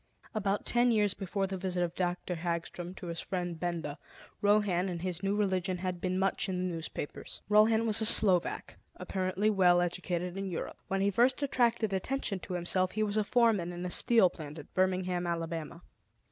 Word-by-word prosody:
About 205 -2 -1
ten 240 +1 +3
years 210 -4 +3
before 195 +1 -2
the 190 -1 -5
visit 180 -1 -1
of 170 -1 -3
Dr. 180 0 -2
Hagstrom 170 +1 -4
to 185 - -9
his 170 -1 -4
friend 175 -3 -4
Benda, 165 -4 -3 0.4
Rohan 205 -3 +2
and 170 -1 -5
his 180 -2 -3
new 195 +1 0
religion 190 -3 0
had 180 -1 -4
been 185 0 -1
much 195 +1 0
in 185 - -2
the 180 - -1
newspapers. 165 -4 -5
Rohan 220 +2 +4
was 220 0 +4
a 220 - +6
Slovak, 185 -6 +3 0.2
apparently 190 +2 -1
well 180 -3 +4
educated 175 +1 -2
in 195 0 -3
Europe. 170 - -5
When 195 0 -1
he 200 +1 +2
first 250 +6 +2
attracted 235 -6 +1
attention 200 0 -1
to 180 +1 -6
himself, 180 +1 +1
he 215 - 0
was 210 0 -1
foreman 225 -8 +2
in 175 +1 -6
a 180 - -4
steel 225 -4 +4
plant 150 -1 -9
at 150 - -11
Birmingham, 185 -1 0
Alabama. 165 0 -4
185 Hz, 185 wpm, -31 LUFS, 175-205 Hz, 0.4 s, a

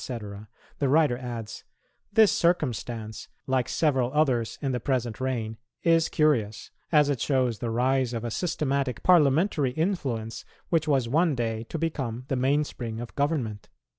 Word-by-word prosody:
[197:1] 105 -4 -7 0.3
The 140 - +1
writer 150 -3 +4
adds, 120 -4 -6 0.5
"This 215 -1 +6
circumstance, 120 - -1 0.2
like 130 -2 0
several 130 -6 +1
others 130 -7 +1
in 135 -3 -1
the 125 - -1
present 120 -2 -2
reign, 115 -4 -2 0.3
is 165 -1 +3
curious, 120 -9 +1 0.2
as 150 -3 +5
it 135 -5 -1
shows 125 -6 +1
the 120 - -3
rise 125 +2 +1
of 115 - -3
a 120 - -3
systematic 140 - -1
parliamentary 155 -4 +3
influence, 135 - -2 0.3
which 160 -2 +1
was 135 -5 +2
one 155 +4 +2
day 115 -2 -2
to 165 - -5
become 135 -7 -3
the 135 - +1
mainspring 130 -4 -1
of 120 -1 -7
government." 135 - -2
130 Hz, 150 wpm, -27 LUFS, 115-150 Hz, 0.5 s, This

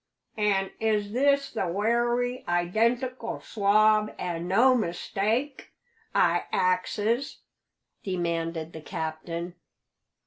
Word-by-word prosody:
"An' 200 -3 +1
is 210 -2 0
this 280 +3 +2
the 220 -5 -2
wery 240 +6 0
identical 230 +9 0
swab, 215 +1 +3
an' 175 -1 -4
no 235 +8 +5
mistake? 225 +5 -2 0.4
I - - +3
axes," 205 +7 0 0.6
demanded 165 -3 -2
the 160 - -8
captain. 165 +1 -5
205 Hz, 90 wpm, -27 LUFS, 175-235 Hz, 0.6 s, no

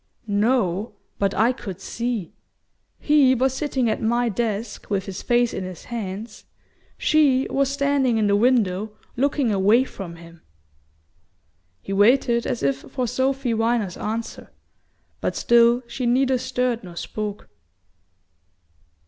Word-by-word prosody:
"No; 210 -1 0 0.2
but 200 0 0
I 230 +5 +3
could 200 -8 -8
see. 235 -7 -4 0.7
HE 285 -4 +4
was 260 +1 +1
sitting 265 -3 -1
at 220 - -1
my 235 +2 +1
desk, 225 0 -3
with 195 -2 -1
his 195 -2 -6
face 240 -1 +2
in 190 - -4
his 185 -2 -8
hands. 215 -1 -6 0.5
SHE 280 -4 +3
was 275 0 +1
standing 280 -3 +1
in 215 - +2
the 200 0 +3
window, 215 -3 +1 0.2
looking 275 -1 +1
away 205 +5 +4
from 190 -9 -8
him..." 170 0 -15 1.4
He 195 - -4
waited, 235 +3 +3
as 240 - -3
if 135 -1 +1
for 255 -2 -4
Sophy 260 +1 0
Viner's 225 -4 0
answer; 225 +2 -5 0.7
but - - -2
still 235 +1 +4
she 235 +1 -3
neither 260 +1 +2
stirred 250 -2 -1
nor 175 -2 -10
spoke. 210 +3 -5
235 Hz, 130 wpm, -23 LUFS, 205-255 Hz, 1.4 s, HE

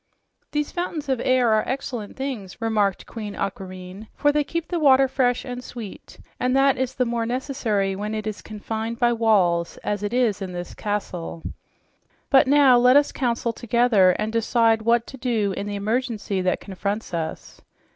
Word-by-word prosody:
"These 295 0 -1
fountains 335 -5 -4
of 260 -3 0
air 255 -3 +3
are 215 0 +3
excellent 245 -5 -4
things," 255 -9 -5
remarked 215 -4 0
Queen 210 -3 -7
Aquareine, 185 +1 -6
"for 290 - +3
they 295 0 +1
keep 335 +3 -4
the 350 - -1
water 270 -3 +5
fresh 250 -2 0
and 250 -1 -6
sweet, 230 -6 -9 0.2
and 255 +1 +1
that 270 0 +4
is 260 0 -2
the 250 - +1
more 235 -1 -1
necessary 235 -6 -1
when 210 +2 -4
it 215 0 -4
is 215 -1 -4
confined 220 +2 -5
by 240 -1 +3
walls, 190 -7 +2
as 205 -1 -2
it 205 0 -2
is 240 -5 +1
in 185 -2 -5
this 175 0 -6
castle. 185 -5 -4 0.9
But 265 -2 +6
now, 270 -3 +6
let 250 +3 +6
us 290 - +3
counsel 235 -2 -1
together 225 -6 +3
and 215 +1 -2
decide 230 0 +2
what 230 +1 +2
to 265 - -10
do 230 -6 0
in 200 +2 -4
the 205 - -3
emergency 215 -2 -1
that 185 0 0
confronts 200 +1 -4
us." 160 -2 -5
230 Hz, 175 wpm, -23 LUFS, 205-255 Hz, 0.9 s, But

